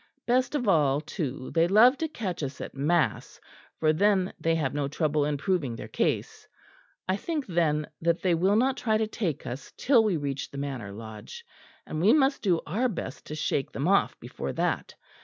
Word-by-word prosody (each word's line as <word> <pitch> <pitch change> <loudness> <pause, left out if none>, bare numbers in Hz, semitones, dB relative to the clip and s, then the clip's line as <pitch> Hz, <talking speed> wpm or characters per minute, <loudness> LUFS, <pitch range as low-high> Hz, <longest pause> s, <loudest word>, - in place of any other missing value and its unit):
Best 255 +4 +1
of 250 -6 -1
all, 145 -7 +3
too, 145 -5 -5
they 165 0 +4
love 225 +8 +6
to 320 - 0
catch 200 - -4
us 140 -2 -5
at - - -6
mass 155 +5 0 0.4
for 155 -1 +3
then 190 +2 +2
they 165 0 +1
have 150 -5 -1
no 145 -1 -1
trouble 150 0 0
in 150 -1 -1
proving 150 -6 -1
their - - -7
case. - - -2 0.6
I 185 - +2
think 300 +7 -3
then 155 -4 +1
that 170 +1 +1
they 185 -2 +3
will 185 +5 +3
not 260 +4 +2
try 220 -3 +1
to 220 - +1
take 200 - -3
us 125 +3 -6
till 245 -4 +4
we 205 -6 +1
reach 140 -2 -3
the 140 - -9
Manor 135 -8 -4
Lodge; 110 - -9 0.4
and 155 - -4
we 210 +7 +6
must 275 -2 +3
do 175 -5 +2
our 230 +11 0
best 170 - -6
to 150 - -5
shake 145 -2 -1
them 140 - -1
off 200 +1 +2
before - - -5
that. - - -1
170 Hz, 195 wpm, -27 LUFS, 145-215 Hz, 0.6 s, love